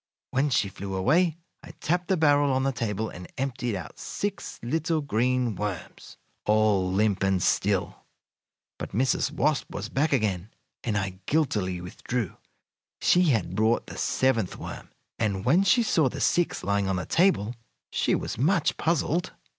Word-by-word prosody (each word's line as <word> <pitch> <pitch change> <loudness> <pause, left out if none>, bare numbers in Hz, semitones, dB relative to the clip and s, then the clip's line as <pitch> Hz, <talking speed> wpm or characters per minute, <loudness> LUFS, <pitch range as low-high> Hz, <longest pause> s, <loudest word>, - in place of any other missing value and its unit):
When 135 +3 +2
she 125 -6 +2
flew 95 0 -6
away 160 - +2 0.2
I - - -12
tapped 175 +2 0
the 190 - +2
barrel 145 -2 +4
on 130 0 +1
the 135 - +2
table 110 -3 -2
and 90 0 -10
emptied 125 -4 -2
out 85 -5 -9
six 205 0 -4
little 160 +5 0
green 125 -2 +1
worms, 100 -3 -6 0.3
all 105 -3 +3
limp 100 0 +1
and 95 -1 +2
still. - - 0 0.8
But - - -6
Mrs. 130 +6 +1
Wasp 150 0 0
was - - -5
back 150 +4 +1
again, 105 -7 0 0.3
and 105 -3 0
I 95 -2 -3
guiltily 105 - 0
withdrew. 100 +4 -4 0.6
She 180 0 +4
had 110 - +1
brought 110 +3 +2
the - - -9
seventh 115 -8 +1
worm, - - -8 0.3
and 100 -2 -1
when 160 +9 +5
she 235 +5 +4
saw 160 - +3
the - - -7
six 175 -1 +1
lying 100 0 +1
on 95 - +1
the 90 - -3
table 165 - +2 0.4
she - - +1
was - - -4
much 165 +3 +2
puzzled. 170 +2 0
120 Hz, 160 wpm, -27 LUFS, 100-155 Hz, 0.8 s, when